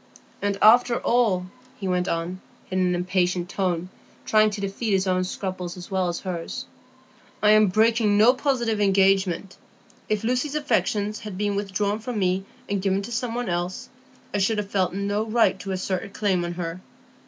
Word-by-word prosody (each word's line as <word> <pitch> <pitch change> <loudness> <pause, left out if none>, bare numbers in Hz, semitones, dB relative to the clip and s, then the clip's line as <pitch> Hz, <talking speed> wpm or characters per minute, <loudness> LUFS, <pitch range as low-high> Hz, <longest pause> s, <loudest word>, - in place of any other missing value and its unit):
"And 200 -1 0
after 235 +2 +6
all," 220 -7 +2 0.3
he 195 - -3
went 180 0 0
on, 170 +2 -3 0.3
in 185 - 0
an 180 -1 +2
impatient 180 0 0
tone, 180 -3 -1 0.4
trying 215 0 +4
to 210 0 -5
defeat 200 +2 -2
his 190 0 +2
own 185 -1 +1
scruples 185 -1 -5
as 180 +2 -10
well 190 -1 +1
as 175 - -3
hers, 175 -3 -5 0.8
"I 210 - +6
am 215 0 +6
breaking 220 +1 +3
no 225 +4 +6
positive 240 -6 0
engagement; 195 -1 +2 0.5
if 215 -1 0
Lucy's 255 +5 0
affections 215 -8 0
had 210 -4 -7
been 205 0 0
withdrawn 200 +1 -1
from 230 +1 -5
me 190 -1 0 0.2
and 200 -1 -1
given 195 0 0
to 240 - -7
some 235 0 -2
one 245 -1 -2
else, 175 +1 -3 0.4
I 205 - +1
should 210 +3 +1
have 205 -1 -3
felt 185 -3 +1
no 200 +2 -1
right 225 +1 +2
to 195 - -5
assert 185 0 -2
a 210 - -8
claim 195 -3 0
on 175 0 -3
her. 170 0 -5
195 Hz, 180 wpm, -24 LUFS, 185-215 Hz, 0.8 s, after